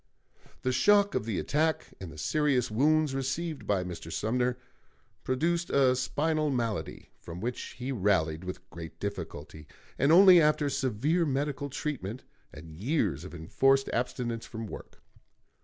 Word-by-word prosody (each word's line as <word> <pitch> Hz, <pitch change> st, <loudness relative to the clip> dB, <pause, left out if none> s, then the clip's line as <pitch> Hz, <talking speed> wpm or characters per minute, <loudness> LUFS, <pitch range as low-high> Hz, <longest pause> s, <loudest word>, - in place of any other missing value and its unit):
The 130 Hz, -, +1 dB
shock 205 Hz, +8 st, +4 dB
of -, -, -1 dB
the 110 Hz, -5 st, -2 dB
attack, 155 Hz, +2 st, 0 dB
and 90 Hz, -4 st, -8 dB
the 75 Hz, -, -12 dB
serious 135 Hz, -, +1 dB
wounds 150 Hz, +5 st, +2 dB
received 140 Hz, +4 st, -3 dB
by 100 Hz, -3 st, +1 dB
Mr. 85 Hz, -2 st, -7 dB
Sumner, 125 Hz, +6 st, 0 dB, 0.7 s
produced 170 Hz, +6 st, 0 dB
a 130 Hz, -2 st, +4 dB
spinal 155 Hz, +4 st, 0 dB
malady, 115 Hz, -5 st, -3 dB
from 85 Hz, 0 st, -9 dB
which 120 Hz, +4 st, -5 dB
he 125 Hz, +2 st, -4 dB
rallied 95 Hz, -8 st, +1 dB
with 90 Hz, 0 st, -7 dB
great 80 Hz, -1 st, -9 dB
difficulty, 80 Hz, -6 st, -6 dB, 0.3 s
and 140 Hz, +3 st, +4 dB
only 180 Hz, 0 st, +8 dB
after 150 Hz, -1 st, +2 dB
severe 135 Hz, +8 st, 0 dB
medical 140 Hz, -1 st, -2 dB
treatment 130 Hz, -5 st, -4 dB, 0.3 s
and 80 Hz, +1 st, -11 dB
years 90 Hz, -, -1 dB
of 90 Hz, -, -9 dB
enforced 135 Hz, +12 st, +2 dB
abstinence 120 Hz, -1 st, -2 dB
from 115 Hz, -1 st, -6 dB
work. 105 Hz, -, -10 dB
125 Hz, 140 wpm, -29 LUFS, 95-150 Hz, 0.7 s, only